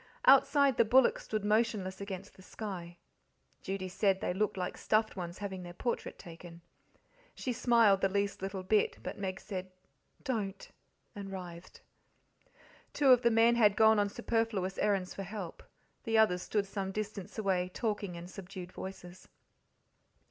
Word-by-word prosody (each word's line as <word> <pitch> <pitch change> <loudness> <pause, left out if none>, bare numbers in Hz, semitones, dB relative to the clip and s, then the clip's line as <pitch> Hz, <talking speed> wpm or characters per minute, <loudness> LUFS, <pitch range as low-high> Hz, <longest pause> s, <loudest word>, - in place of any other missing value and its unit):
Outside 275 0 +5
the - - +6
bullocks 250 +3 +4
stood 215 -2 -2
motionless 210 -3 0
against 200 0 -7
the - - -17
sky 180 -4 -7 0.6
Judy 190 -1 -4
said 190 +1 +1
they 180 - -1
looked 205 +1 -1
like 180 -1 -3
stuffed 215 0 +1
ones 175 -1 -5
having 195 -2 -5
their 175 -1 -9
portrait 240 +4 -3
taken. 170 -1 -11 0.7
She 255 - -3
smiled 230 -5 +4
the 195 - +3
least 200 0 -1
little 195 -1 -4
bit, 210 +3 +2
but - - -6
Meg 190 -1 -3
said, 185 -2 -6 0.5
"Don't," 210 -7 -3 0.4
and 200 -1 -7
writhed. 180 -2 -9 1.1
Two 280 -2 +3
of 250 -2 +7
the 235 - +4
men 230 +1 +5
had 210 -3 +5
gone 220 -1 +6
on 205 0 +2
superfluous 225 -4 -1
errands 195 -3 0
for - - -6
help; 195 -3 -6 0.4
the 225 -2 +1
others 180 -5 +4
stood 205 +1 -1
some 195 -1 -4
distance 210 -1 -5
away, 185 -4 0
talking 205 -4 -2
in 170 +1 -8
subdued 185 -1 -9
voices. 185 -1 -9
200 Hz, 155 wpm, -32 LUFS, 185-220 Hz, 1.1 s, of